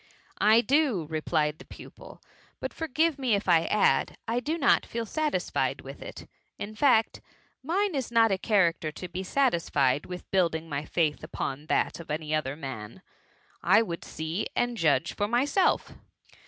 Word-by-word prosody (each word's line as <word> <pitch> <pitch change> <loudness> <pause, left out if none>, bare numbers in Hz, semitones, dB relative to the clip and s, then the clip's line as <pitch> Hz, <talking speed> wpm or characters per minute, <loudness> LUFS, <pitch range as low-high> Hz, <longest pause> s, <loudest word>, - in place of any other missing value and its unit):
•* - - -30 0.4
I 220 +2 +6
do, 260 - +2
replied 155 0 0
the - - -12
pupil; - - -13 0.2
" - - -32
but - - -5
forgive 320 0 0
me 250 -5 +2
if 200 - -3
I 165 -2 +4
add 210 - +2
— - - -51
I 230 +2 0
do 305 +7 -2
not 280 -4 +3
feel 230 0 -4
satisfied 310 +5 -1
with - - -10
it: - - -9 0.3
in 205 +2 -6
fact, 225 -1 +2 0.4
mine 380 +7 0
is 265 -5 -3
not 225 -2 +4
a 190 - 0
character 170 -6 +1
to 180 - -7
be 185 +1 -5
satisfied 170 - +1
with 180 0 -8
build 180 -4 +2
ing 160 +1 -5
my 145 -1 -4
faith 155 -2 0
upon 140 +3 -5
that - - 0
of 165 - -10
any 155 0 -3
other 145 -3 -1
man. 135 - -8 0.6
I 225 - +5
would 170 -6 -6
see 160 +6 -4
and 245 0 0
judge 160 - +1
for 205 - -1
myself. 270 - +1
190 Hz, 180 wpm, -28 LUFS, 160-245 Hz, 0.6 s, I